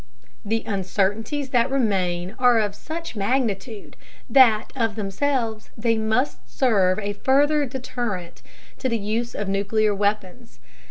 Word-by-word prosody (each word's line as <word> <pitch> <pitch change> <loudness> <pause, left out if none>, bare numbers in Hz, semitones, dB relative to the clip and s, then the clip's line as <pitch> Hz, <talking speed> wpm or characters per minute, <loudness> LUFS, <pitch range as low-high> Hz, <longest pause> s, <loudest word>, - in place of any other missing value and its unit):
The 225 +2 -1
uncertainties 205 - -1
that 245 0 +3
remain 190 -8 0
are 245 -2 +5
of 210 -2 0
such 320 +7 -7
magnitude 215 -1 -2 0.3
that 235 -6 +5
of 225 -5 0
themselves 220 +2 -2
they 230 +1 +1
must 220 +5 0
serve 195 -8 +2
as 215 - -4
a - - -2
further 290 +2 +3
deterrent 240 -8 -5 0.4
to 260 - -1
the 230 - 0
use 225 +3 -3
of 205 - -3
nuclear 205 +2 +1
weapons. 205 +2 -2
220 Hz, 130 wpm, -23 LUFS, 200-255 Hz, 0.4 s, are